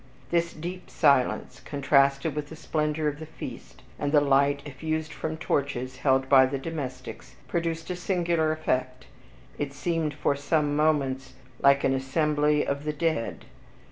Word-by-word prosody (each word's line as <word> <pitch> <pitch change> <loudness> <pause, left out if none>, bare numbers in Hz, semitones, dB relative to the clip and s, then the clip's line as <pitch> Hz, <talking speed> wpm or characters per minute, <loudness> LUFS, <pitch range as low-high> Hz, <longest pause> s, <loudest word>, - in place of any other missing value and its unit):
This 170 0 +1
deep 175 +3 -7
silence, 140 -5 +2
contrasted 140 +1 +2
with 150 0 -4
the 160 - -8
splendor 150 0 -1
of 145 0 -2
the 160 - -8
feast, 160 - -9 0.2
and 145 - -1
the 150 - +6
light 140 0 +3
effused 155 +2 -3
from 155 +2 -4
torches 130 -5 -2
held 130 -1 +2
by 130 -1 +7
the 135 +1 -2
domestics, 130 -4 -6
produced 165 0 -2
a - - -2
singular 170 -3 +1
effect, 130 -5 -2 0.5
it 145 -1 -2
seemed 155 0 -1
for 145 -1 +1
some 145 0 0
moments 135 -4 +1 0.3
like 140 0 +5
an 135 - +3
assembly 150 +2 +1
of 140 +1 -2
the 150 0 -2
dead. 155 -6 -2
145 Hz, 150 wpm, -27 LUFS, 135-160 Hz, 0.5 s, by